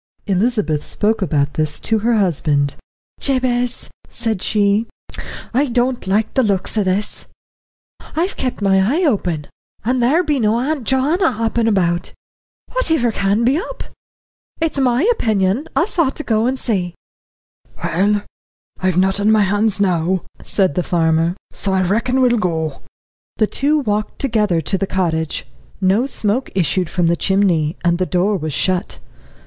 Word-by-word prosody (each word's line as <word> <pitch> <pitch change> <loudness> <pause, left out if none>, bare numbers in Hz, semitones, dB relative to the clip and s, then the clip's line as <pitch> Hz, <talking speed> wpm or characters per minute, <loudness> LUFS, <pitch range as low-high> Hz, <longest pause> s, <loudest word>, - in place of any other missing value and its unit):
Elizabeth 195 -6 0
spoke 220 +1 0
about 145 -5 0
this 155 -1 +1
to 220 -1 0
her 230 +2 +1
husband. 145 -7 +1 0.5
"Jabez," 250 -2 0 0.2
said 225 -5 -2
she, 210 +1 +1 0.7
"I 280 +4 +2
don't 245 -2 0
like 210 +3 +1
the 265 - +3
looks 200 -4 -1
o' 215 - +2
this; 190 +2 -2 0.9
I've 350 +5 0
kept 250 -5 -3
my 195 -1 +4
eye 275 - +1
open, 180 - 0 0.4
and 250 +2 +1
there 295 +9 +3
be 300 -4 0
no 220 0 +2
Auntie 275 0 -2
Joanna 285 - +2
hoppin' 230 +1 0
about. 175 -5 0 0.6
Whativer 320 - +1
can 200 +3 +1
be 260 +5 +3
up? - - -6 0.8
It's 320 -3 -1
my 255 +1 +2
opinion 220 - 0
us 355 +1 0
ought 275 -5 +2
to 305 - -5
go 225 -2 +1
and 260 +1 0
see." 185 -9 -2 0.9
"Well, 205 +4 +1 0.6
I've 185 -2 0
naught 190 +1 +2
on 205 +1 +2
my 220 -1 +5
hands 205 +2 +1
now," 180 -1 +1 0.2
said 190 -7 +2
the 180 - 0
farmer, 165 0 +1 0.2
"so 195 - 0
I 190 0 +2
reckon 235 +8 +1
we 250 - +5
will 240 -1 +2
go." 160 -6 -2 0.6
The 215 - +3
two 285 +7 +1
walked 210 -6 -2
together 210 -10 +1
to 190 +5 -1
the 195 - -1
cottage. 160 -5 -1 0.3
No 195 +7 +2
smoke 235 -1 -1
issued 185 -1 +1
from 175 -2 0
the 170 +1 +3
chimney, 175 -5 +1
and 170 0 +2
the 185 - 0
door 190 +3 +1
was 155 -4 -3
shut. 185 +6 0
205 Hz, 155 wpm, -18 LUFS, 185-245 Hz, 0.9 s, my